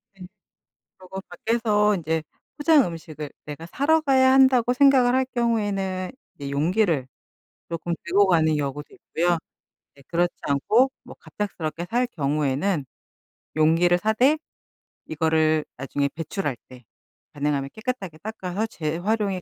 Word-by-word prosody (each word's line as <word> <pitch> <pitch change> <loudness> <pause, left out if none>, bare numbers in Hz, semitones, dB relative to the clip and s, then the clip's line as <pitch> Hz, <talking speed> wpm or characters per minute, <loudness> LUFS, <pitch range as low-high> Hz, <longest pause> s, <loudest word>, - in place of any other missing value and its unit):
네. 185 -2 -11 0.7
그리고 190 +1 -8
밖에서 210 +1 +1
인제 160 -2 -1 0.3
'포장 295 -3 +5
음식을 155 -3 -7
내가 150 +2 -8
사러 300 - +2
가야 265 -3 +4
한다.'고 260 -2 +5
생각을 255 -2 +5
할 260 0 +3
경우에는 200 -6 -1 0.3
이 140 -1 -5
용기를 160 -1 +1 0.6
조금 170 0 -3
들고 195 +4 +4
가는 160 -4 +3
경우도 145 0 -3
있고요. 175 +1 0 0.6
예. - - -16
그렇지 175 +1 +1
않고 220 - +2
뭐 - - -12
갑작스럽게 175 -5 -4
살 245 +2 +1
경우에는 150 - -1 0.7
용기를 165 +3 +4
사되 230 - +3 0.7
이거를 155 0 +1
나중에 140 +2 -1
배출할 165 -3 -3
때 125 -1 -13 0.5
가능하면 140 -1 -1
깨끗하게 220 -8 -5
닦아서 210 -1 -3
재활용이 190 +3 -2
180 Hz, 290 characters per minute, -24 LUFS, 155-225 Hz, 0.7 s, 포장